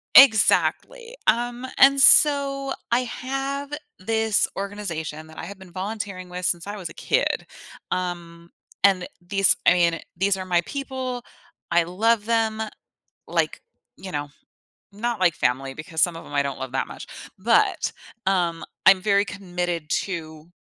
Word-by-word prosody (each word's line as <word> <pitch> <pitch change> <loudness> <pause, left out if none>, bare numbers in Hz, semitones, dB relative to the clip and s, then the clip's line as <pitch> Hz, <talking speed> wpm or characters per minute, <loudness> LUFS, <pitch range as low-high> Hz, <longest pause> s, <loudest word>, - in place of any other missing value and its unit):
Exactly. 465 - +5
Um, 240 +3 +1
and 275 0 +6
so 275 -1 +5 0.2
I 235 - +4
have 270 +3 -4 0.3
this 220 +2 +2
organization 170 -6 -5
that 160 0 -15
I - - -6
have 195 +2 -10
been 190 -2 -14
volunteering 190 -1 -5
with 180 0 -5
since 175 -1 +1
I 205 +1 -5
was 180 -5 -6
a - - -11
kid, - - 0 0.5
um, 170 -2 -4 0.3
and 190 -2 +4
these 195 +2 +3
I - - +7
mean, 170 -2 +2 0.2
these 195 +2 +1
are 185 - -5
my 175 -1 +2
people, 260 -3 -5 0.5
I 170 0 +4
love 210 +5 +1
them, 225 -1 0 0.7
like, - - -1 0.4
you 190 - -8
know, 145 -2 -4 0.6
not 235 +2 -3
like 175 -4 +3
family 135 +2 -1
because 155 +2 -5
some 175 - +3
of 165 - -9
'em - - -10
I 140 - +3
don't 140 -1 -4
love 130 -1 -5
that 135 - -1
much. - - -10 0.3
But, 230 +5 +2 0.3
um, 175 -3 0 0.2
I'm 190 -1 +7
very 200 0 +3
committed 175 -5 -4 0.2
to 160 -3 -7
190 Hz, 150 wpm, -23 LUFS, 170-230 Hz, 0.7 s, I